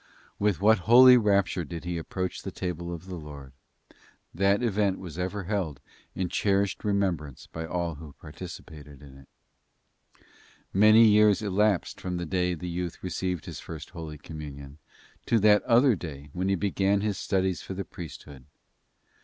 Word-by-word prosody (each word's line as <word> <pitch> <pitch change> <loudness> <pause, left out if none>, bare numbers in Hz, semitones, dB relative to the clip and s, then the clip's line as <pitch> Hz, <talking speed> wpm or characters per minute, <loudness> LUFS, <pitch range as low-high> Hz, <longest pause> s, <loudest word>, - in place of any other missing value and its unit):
With 100 -5 +1
what 110 +1 +5
holy 125 +1 +9
rapture 100 -6 +2
did 85 +1 -7
he 85 -1 -3
approach 90 +3 -4
the - - -5
table 85 -1 -5
of 85 0 -7
the 95 -1 -7
Lord. 70 -4 -10 0.8
That 100 +5 +2
event 100 -4 +1
was 90 -3 -8
ever 95 +2 -3
held 90 -8 -3 0.4
in 95 - -1
cherished 100 +2 0
remembrance 95 - -1
by 80 0 -7
all 85 0 -2
who 75 -1 -11
participated 75 -3 -11
in 70 -2 -14
it. 65 - -19 1.4
Many 110 +3 +7
years 105 0 +4
elapsed 105 -2 0
from 90 -1 -3
the 85 - -3
day 90 +1 0
the 90 +2 -7
youth 85 0 -5
received 90 -2 -3
his - - -7
First 80 -3 -9
Holy 80 -3 -8
Communion 70 -1 -9 0.5
to 115 - +3
that 105 0 +5
other 120 0 +5
day 75 -5 -9
when 90 +2 -1
he 95 - +3
began 100 +1 +1
his 105 -2 -2
studies 95 -2 0
for 95 - -7
the 100 0 -4
priesthood. 70 -5 -10
90 Hz, 160 wpm, -27 LUFS, 80-100 Hz, 1.4 s, holy